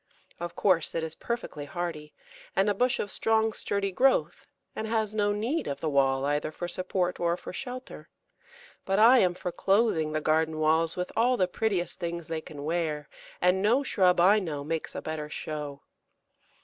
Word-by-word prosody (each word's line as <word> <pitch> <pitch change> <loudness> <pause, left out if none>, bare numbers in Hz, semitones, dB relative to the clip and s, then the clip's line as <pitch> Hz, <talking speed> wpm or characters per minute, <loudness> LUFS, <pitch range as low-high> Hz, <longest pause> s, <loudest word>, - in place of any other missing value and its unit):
Of 175 0 -5
course 180 -5 +2
it 165 - -1
is 160 -1 -4
perfectly 225 -11 -5
hardy, 155 -1 -5 0.4
and 195 +1 +3
a 205 - +3
bush 245 +4 +1
of 205 - -3
strong, 220 0 +1
sturdy 200 -1 -2
growth, 265 +8 +1 0.3
and 220 - -3
has 220 -2 0
no 205 -1 +1
need 235 +10 -1
of 140 - -3
the 155 - -2
wall 135 -1 +2
either 145 +1 0
for 175 - -5
support 180 0 -2
or 170 0 +1
for - - -9
shelter; 255 +4 -7 0.7
but 195 0 0
I 235 +4 +7
am 180 -4 +2
for 180 0 -4
clothing 195 -6 +2
the 155 - 0
garden 155 +1 +1
walls 160 +1 +2
with 180 0 -3
all 245 +3 +3
the 185 - +2
prettiest 185 -2 -1
things 170 -2 -4
they 160 -1 -2
can 145 -2 -9
wear, 155 -2 -2 0.3
and 180 +1 +3
no 235 +7 +3
shrub 185 -8 +3
I 195 +5 +6
know 155 -7 -4
makes 160 +2 -4
a - - -5
better 155 -1 -4
show. 150 -2 -6
175 Hz, 185 wpm, -28 LUFS, 155-210 Hz, 0.7 s, I